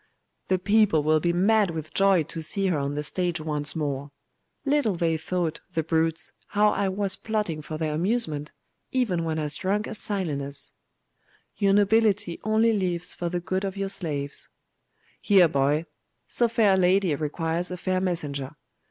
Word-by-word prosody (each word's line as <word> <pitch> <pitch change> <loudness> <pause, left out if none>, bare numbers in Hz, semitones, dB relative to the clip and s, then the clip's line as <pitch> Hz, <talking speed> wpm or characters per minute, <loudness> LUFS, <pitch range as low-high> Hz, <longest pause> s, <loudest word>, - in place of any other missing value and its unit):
'The 185 - +2
people 205 -5 +3
will 155 +1 +3
be 170 +2 +1
mad 200 +3 +3
with 160 -2 -6
joy 195 -4 +4
to 160 +2 -7
see 195 +5 -2
her 175 -6 +1
on 140 +1 -2
the 150 - -2
stage 175 +2 -1
once 150 -1 -1
more. 145 -2 -2 0.6
Little 280 -8 +2
they 165 -1 +1
thought, 165 0 -2
the 160 - 0
brutes, 160 +1 0 0.2
how 210 +1 +3
I 200 -1 0
was 195 0 -1
plotting 210 -8 -2
for 155 +1 -6
their 155 -1 -1
amusement, 160 -4 -1 0.4
even 215 -10 0
when 160 -1 -2
as 150 -2 -1
drunk 205 +3 0
as 220 - -5
Silenus.' 145 -9 -2 0.8
'Your 200 -2 +2
nobility 205 -3 +2
only 220 +2 +3
lives 180 -4 -1
for 175 - -3
the 175 0 -2
good 185 +2 -2
of 195 0 -3
your 195 0 -2
slaves.' 150 -8 -4 0.7
'Here, 190 -4 +6
boy! 145 +1 +1 0.4
So 240 - +2
fair 220 -3 +3
a - - +3
lady 185 -1 +3
requires 160 +4 -2
a 180 - -5
fair 185 +1 -1
messenger. 150 -6 -2
175 Hz, 170 wpm, -26 LUFS, 155-200 Hz, 0.8 s, Here